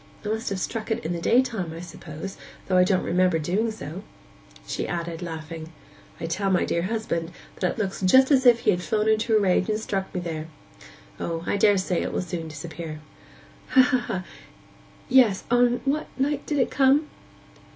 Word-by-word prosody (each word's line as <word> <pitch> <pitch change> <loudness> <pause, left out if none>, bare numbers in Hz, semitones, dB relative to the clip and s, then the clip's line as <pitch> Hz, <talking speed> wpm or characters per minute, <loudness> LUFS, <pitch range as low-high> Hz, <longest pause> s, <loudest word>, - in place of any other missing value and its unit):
I - - -2
must 220 +1 -2
have 195 -1 -3
struck 225 +4 -4
it 225 +1 -2
in 165 - -1
the 170 - -4
daytime, 225 -5 +2
I - - -7
suppose, 170 +1 -8 0.3
though 185 - 0
I 180 - +7
don't 185 0 +2
remember 180 -1 +2
doing 185 +9 0
so.' 190 -5 -7 0.6
She - - -3
added, 170 -1 -4
laughing, 160 -1 -7 0.5
'I - - -4
tell 195 +4 -1
my 185 -2 +2
dear 170 - 0
husband 185 -4 -2 0.3
that 180 - 0
it - - -15
looks 195 -4 -2
just 260 +9 +5
as 260 -2 +5
if 235 -1 +6
he - - +4
had 180 -2 -1
flown 215 +2 0
into 220 +1 +3
a - - +4
rage 185 -1 +2
and 215 0 0
struck 195 -3 -3
me - - 0
there. 160 -2 -4 0.7
O, 165 -1 -3
I - - 0
daresay 195 -3 +2
it - - -2
will - - -1
soon 175 -2 -5
disappear.' 155 0 -7 0.7
'Ha, - - +3
ha! 240 -8 -1 0.8
Yes... 245 -7 +4
On 245 0 +3
what 290 +3 0
night 280 +1 -1
did 295 - 0
it 260 - +1
come? 275 +3 +4
190 Hz, 190 wpm, -25 LUFS, 170-230 Hz, 0.8 s, I